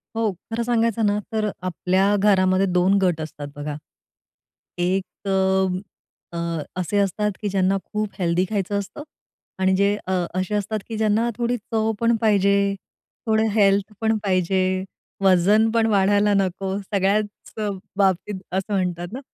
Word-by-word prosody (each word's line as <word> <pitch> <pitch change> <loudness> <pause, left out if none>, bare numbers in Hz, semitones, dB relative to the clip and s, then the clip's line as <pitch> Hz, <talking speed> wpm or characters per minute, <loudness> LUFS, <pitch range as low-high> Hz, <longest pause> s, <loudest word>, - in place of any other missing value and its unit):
हो, 225 -2 +1 0.2
खरं 235 +1 -1
सांगायचं 230 -2 +1
ना, 205 0 +2
तर 215 -1 0
आपल्या 185 +3 +1
घरामध्ये 190 -1 +3
2 185 +3 +3
गट 175 -4 +1
असतात 150 -2 -7
बघा. 145 0 -5 1.0
एक 185 +2 +1 1.3
अ, - - -4 0.4
असे 185 +3 -1
असतात, 210 +2 0
की 205 - -1
ज्यांना 190 0 +2
खूप 210 -1 -1
हेल्थी 175 +1 +1
खायचं 200 -1 -1
असतं 245 +9 -7 0.6
आणि 190 0 +3
जे 200 +1 +2
अ, - - -2 0.3
असे 190 +3 -1
असतात, 210 +1 -1
की 220 - -4
ज्यांना 220 +2 +2
थोडी 240 0 0
चव 220 +1 -1
पण 235 0 +3
पाहिजे, 200 -2 +3 0.5
थोडं 220 0 +3
हेल्थ 200 0 +2
पण 220 0 +2
पाहिजे, 185 -1 +1 0.6
वजन 195 +4 +4
पण 230 -1 +2
वाढायला 205 0 +3
नको, 195 0 0
सगळ्याच 200 +1 +1 0.7
बाबतीत 190 0 +1
असं 190 +2 -2
म्हणतात 175 -2 -1
ना. 260 - -4
200 Hz, 140 wpm, -23 LUFS, 185-215 Hz, 1.3 s, वजन